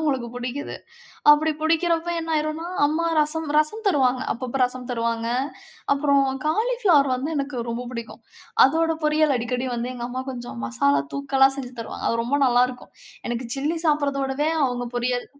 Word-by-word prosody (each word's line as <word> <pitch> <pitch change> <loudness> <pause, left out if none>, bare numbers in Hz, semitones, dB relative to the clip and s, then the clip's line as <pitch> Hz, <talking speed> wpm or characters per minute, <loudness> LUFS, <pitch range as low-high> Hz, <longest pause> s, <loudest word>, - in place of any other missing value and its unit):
அவங்களுக்கு 270 -6 0
பிடிக்குது. 250 +4 -5 0.6
அப்படி 310 +2 +5
பிடிக்கிறப்போ 330 +1 +1
என்ன 325 0 -5
ஆயிடும்னா, 310 +2 -2 0.2
அம்மா 315 +3 0
ரசம் 310 +1 +1
ரசம் 365 +9 +1
தருவாங்க. 260 -7 +3
அப்பப்போ 255 +2 -4
ரசம் 250 0 -5
தருவாங்க. 230 -1 -1 0.6
அப்புறம் 280 -1 +3 0.2
காலிஃப்ளவர் 395 - +3
வந்து 265 +5 -3
எனக்கு 275 -2 -3
ரொம்ப 235 +2 -3
பிடிக்கும். 235 -2 -7 0.4
அதோட 325 +3 +2
பொரியல் 300 -2 +3
அடிக்கடி 250 +2 -2
வந்து 240 +1 -3
எங்க 240 - -5
அம்மா 255 +1 -4
கொஞ்சம் 240 - -7
மசாலா 140 +4 +2
தூக்கலா 270 -1 +3
செஞ்சு 255 -1 -6
தருவாங்க. - - -5
அது 230 0 0
ரொம்ப 280 +4 +1
நல்லாருக்கும். 250 0 +1 0.4
எனக்கு 240 0 -3
சில்லி 300 +5 -1
சாப்பிடுறதோடவே 285 -1 +1 0.2
அவங்க 245 -2 -2
பொரியல் 245 0 -1
270 Hz, 150 wpm, -23 LUFS, 245-310 Hz, 0.6 s, அப்படி